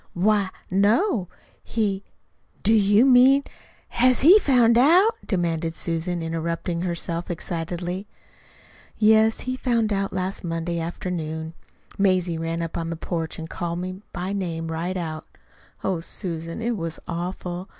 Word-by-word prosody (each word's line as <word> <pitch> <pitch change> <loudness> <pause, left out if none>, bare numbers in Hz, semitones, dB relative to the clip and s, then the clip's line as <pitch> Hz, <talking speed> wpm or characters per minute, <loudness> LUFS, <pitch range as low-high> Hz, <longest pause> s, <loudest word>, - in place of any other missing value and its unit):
"Why, 200 +1 +2 0.2
no. 205 - +2 0.4
He 205 -3 -1 0.6
Do 220 - +4
you 205 +2 +5
mean 265 +2 +6 0.5
HAS 255 0 +3
he 360 +9 +8
found 245 - +4
out?" 340 - +6 0.2
demanded 165 -3 -1
Susan, 170 +1 -2
interrupting 165 +1 -2
herself 170 -1 -3
excitedly. 175 +3 -4 0.9
"Yes. 220 +1 +4
He 255 0 -3
found 235 -4 +1
out 195 0 -1
last 185 +1 -3
Monday 170 0 -2
afternoon. 160 -2 -4 0.5
Mazie 185 -4 +2
ran 165 +1 -2
up 165 - -5
on 165 - -3
to - - -4
the 165 - -3
porch 165 -1 -4
and 160 - -6
called 170 0 -4
me 185 +2 -5
by 180 +3 -4
name 165 -4 -3
right 175 +3 -2
out. 160 -2 -5 0.6
Oh, 190 -3 0
Susan, 165 +2 -5
it 235 0 0
was 165 -4 -5
awful. 180 +1 -4
180 Hz, 140 wpm, -24 LUFS, 165-215 Hz, 0.9 s, he